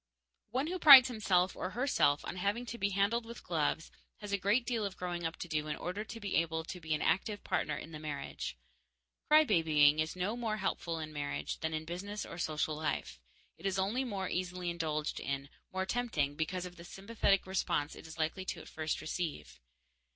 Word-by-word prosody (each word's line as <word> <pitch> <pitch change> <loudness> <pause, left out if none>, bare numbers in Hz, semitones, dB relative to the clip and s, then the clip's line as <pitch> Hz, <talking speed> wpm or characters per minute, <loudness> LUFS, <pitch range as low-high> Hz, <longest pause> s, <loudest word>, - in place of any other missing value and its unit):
_ - - -58 0.5
One 255 +6 0
who 365 +3 -3
prides 275 -5 +11
himself 190 -6 +2
or 185 - -3
herself 205 - +2
on - - -5
having 200 +6 0
to 235 0 -6
be 200 - +2
handled 200 +4 +1
with 235 +1 -10
gloves 160 -2 -1 0.3
has 205 -1 -7
a 200 - +2
great 210 +6 +2
deal 235 -4 -1
of 200 -2 -4
growing 175 -2 -2
up 165 - -8
to - - -6
do 155 -2 -1
in 150 - -2
order 185 +4 -4
to 230 +1 -8
be 205 -3 -1
able 160 -1 0
to 180 +2 -7
be 160 -2 -1
an 150 - -2
active 205 +1 0
partner 150 -1 -1
in 165 - -8
the 155 - -7
marriage. 145 - -5 0.7
Cry 305 +1 +7
babying 155 - +4
is 155 +2 0
no 185 +5 -1
more 225 -3 -2
helpful 175 -4 -2
in 155 -1 -6
marriage 145 -1 -3
than 160 0 -2
in 155 0 -4
business 200 +5 -5
or 170 - -8
social 155 -2 -1
life; 150 - -3 0.4
it - - -11
is 190 -1 0
only 205 +8 +1
more 200 -7 -3
easily 180 -1 -2
indulged 155 -3 -2
in, 140 0 -3 0.2
more 190 0 -1
tempting 190 -11 0
because 175 +4 -2
of 180 0 -9
the 170 - -10
sympathetic 195 +1 0
response 175 -5 0
it - - -11
is 160 +1 -10
likely 165 +4 -2
at - - -10
first 155 0 -2
to - - -8
receive. 155 - -4
180 Hz, 210 wpm, -33 LUFS, 155-205 Hz, 0.7 s, prides